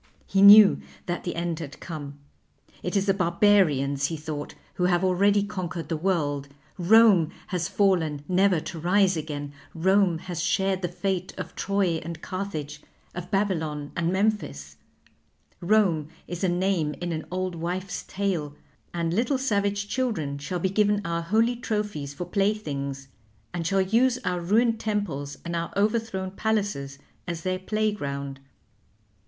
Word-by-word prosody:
He 195 Hz, -, +1 dB
knew 205 Hz, 0 st, +9 dB, 0.2 s
that 175 Hz, -1 st, -3 dB
the 175 Hz, -, -3 dB
end 170 Hz, -1 st, -2 dB
had 150 Hz, -3 st, -8 dB
come. 145 Hz, -4 st, -7 dB, 0.6 s
It 180 Hz, -, -3 dB
is 195 Hz, -, +1 dB
the 195 Hz, -, +3 dB
Barbarians, 170 Hz, -7 st, +3 dB
he 165 Hz, -, -4 dB
thought, 150 Hz, -1 st, -6 dB, 0.2 s
who 180 Hz, -, 0 dB
have 175 Hz, 0 st, +2 dB
already 200 Hz, +2 st, +3 dB
conquered 180 Hz, -5 st, -5 dB
the 165 Hz, -, 0 dB
world. 150 Hz, -5 st, -1 dB, 0.3 s
Rome 195 Hz, -3 st, +6 dB, 0.2 s
has 175 Hz, -2 st, -1 dB
fallen 165 Hz, -8 st, +1 dB
never 185 Hz, -1 st, +3 dB
to 165 Hz, +1 st, -7 dB
rise 185 Hz, +3 st, +3 dB
again; 145 Hz, -2 st, -5 dB, 0.2 s
Rome 190 Hz, +1 st, +3 dB
has 175 Hz, 0 st, -5 dB
shared 190 Hz, +2 st, +1 dB
the 175 Hz, -, 0 dB
fate 185 Hz, +1 st, -3 dB
of -, -, -6 dB
Troy 195 Hz, -5 st, 0 dB
and 165 Hz, 0 st, -6 dB
Carthage, 155 Hz, -6 st, -5 dB, 0.3 s
of 175 Hz, 0 st, -7 dB
Babylon, 160 Hz, -8 st, -1 dB
and 170 Hz, 0 st, 0 dB
Memphis; 190 Hz, -, -1 dB, 0.8 s
Rome 175 Hz, -5 st, +2 dB, 0.2 s
is 175 Hz, +1 st, -5 dB
a 185 Hz, -, +3 dB
name 175 Hz, -4 st, 0 dB
in 175 Hz, -1 st, -3 dB
an 160 Hz, -1 st, -4 dB
old 185 Hz, 0 st, -2 dB
wife's 180 Hz, +3 st, -4 dB
tale; 180 Hz, -7 st, -2 dB, 0.4 s
and 170 Hz, -1 st, -1 dB
little 245 Hz, +7 st, +1 dB
savage 205 Hz, -5 st, 0 dB
children 205 Hz, -, -2 dB
shall 160 Hz, +6 st, -3 dB
be 185 Hz, +2 st, 0 dB
given 205 Hz, 0 st, +2 dB
our 170 Hz, 0 st, -1 dB
holy 220 Hz, +8 st, +2 dB
trophies 210 Hz, -11 st, -3 dB
for 160 Hz, +5 st, -6 dB
playthings, 150 Hz, -9 st, -2 dB, 0.5 s
and 165 Hz, -2 st, -2 dB
shall 195 Hz, +1 st, +2 dB
use 235 Hz, +6 st, +3 dB
our 180 Hz, -1 st, 0 dB
ruined 225 Hz, +5 st, +2 dB
temples 170 Hz, -10 st, -3 dB
and 170 Hz, 0 st, -3 dB
our 170 Hz, 0 st, -2 dB
overthrown 210 Hz, -3 st, 0 dB
palaces 195 Hz, -10 st, -2 dB, 0.3 s
as 170 Hz, -1 st, -4 dB
their 185 Hz, 0 st, -1 dB
playground. 145 Hz, -10 st, -2 dB
180 Hz, 150 wpm, -26 LUFS, 160-200 Hz, 0.8 s, knew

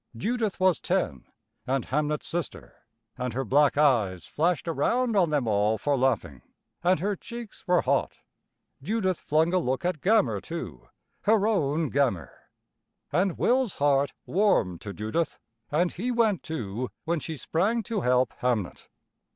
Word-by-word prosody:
Judith 220 Hz, -, -1 dB
was 185 Hz, -3 st, +3 dB
ten, 65 Hz, -3 st, -1 dB, 0.4 s
and 135 Hz, -1 st, 0 dB
Hamnet's 150 Hz, +2 st, -1 dB
sister, 175 Hz, 0 st, -5 dB, 0.3 s
and 125 Hz, -2 st, -2 dB
her 135 Hz, +2 st, -2 dB
black 145 Hz, +5 st, +3 dB
eyes 110 Hz, -, +2 dB
flashed 170 Hz, +2 st, 0 dB
around 230 Hz, -, +1 dB
on 180 Hz, -5 st, +4 dB
them 145 Hz, -6 st, 0 dB
all 105 Hz, +1 st, +2 dB
for 145 Hz, +7 st, 0 dB
laughing, 125 Hz, -, 0 dB, 0.4 s
and 180 Hz, -1 st, +3 dB
her 205 Hz, +2 st, 0 dB
cheeks 235 Hz, +3 st, -9 dB
were 180 Hz, -1 st, +3 dB
hot. -, -, 0 dB, 0.6 s
Judith 190 Hz, +1 st, -1 dB
flung 160 Hz, +3 st, +1 dB
a 185 Hz, -, +4 dB
look 130 Hz, 0 st, -2 dB
at 175 Hz, -5 st, -1 dB
Gammer, 140 Hz, -, +2 dB
too, 75 Hz, -, -7 dB, 0.4 s
her 210 Hz, -1 st, +4 dB
own 160 Hz, -8 st, +1 dB
Gammer. 120 Hz, -, 0 dB, 0.8 s
And 185 Hz, -1 st, +1 dB
Will's 250 Hz, -3 st, +2 dB
heart 140 Hz, -1 st, +2 dB
warmed 155 Hz, -, +1 dB
to 100 Hz, -, -6 dB
Judith, 110 Hz, +11 st, -2 dB, 0.3 s
and 170 Hz, +4 st, +1 dB
he 225 Hz, +8 st, -3 dB
went 225 Hz, -6 st, +2 dB
too 120 Hz, -5 st, -4 dB, 0.2 s
when 170 Hz, 0 st, 0 dB
she 160 Hz, +1 st, -6 dB
sprang 210 Hz, -, 0 dB
to 225 Hz, -4 st, -2 dB
help 125 Hz, -2 st, +2 dB
Hamnet. 120 Hz, -7 st, -1 dB
155 Hz, 150 wpm, -27 LUFS, 125-190 Hz, 0.8 s, on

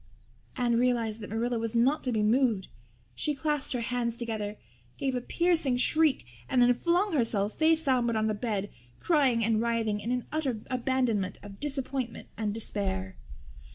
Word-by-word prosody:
Anne 240 Hz, -2 st, +2 dB
realized 235 Hz, -3 st, +1 dB
that 210 Hz, -, -7 dB
Marilla 230 Hz, +2 st, -1 dB
was 230 Hz, 0 st, -3 dB
not 260 Hz, +6 st, +3 dB
to 255 Hz, -, -1 dB
be 215 Hz, -2 st, +1 dB
moved. 225 Hz, -3 st, +2 dB, 0.4 s
She 300 Hz, -, 0 dB
clasped 295 Hz, -1 st, 0 dB
her 245 Hz, -, -1 dB
hands 235 Hz, -1 st, -2 dB
together, 215 Hz, -3 st, -4 dB, 0.4 s
gave 270 Hz, -1 st, -1 dB
a 250 Hz, -, -1 dB
piercing 325 Hz, -4 st, +2 dB
shriek, 305 Hz, -, +3 dB, 0.2 s
and 255 Hz, -, +2 dB
then 245 Hz, 0 st, +6 dB
flung 350 Hz, -, +1 dB
herself 220 Hz, -6 st, 0 dB
face 320 Hz, 0 st, +3 dB
downward 245 Hz, -4 st, +1 dB
on 215 Hz, 0 st, +1 dB
the 215 Hz, -, +1 dB
bed, 205 Hz, -2 st, -3 dB, 0.3 s
crying 265 Hz, -9 st, +2 dB
and 225 Hz, -1 st, +2 dB
writhing 230 Hz, -3 st, 0 dB
in 225 Hz, -, -5 dB
an 250 Hz, -1 st, -1 dB
utter 285 Hz, -7 st, -1 dB
abandonment 245 Hz, -7 st, 0 dB
of 200 Hz, -1 st, -11 dB
disappointment 270 Hz, -4 st, -3 dB
and 210 Hz, -1 st, -2 dB
despair. 190 Hz, -3 st, -2 dB
240 Hz, 165 wpm, -29 LUFS, 220-265 Hz, 0.4 s, then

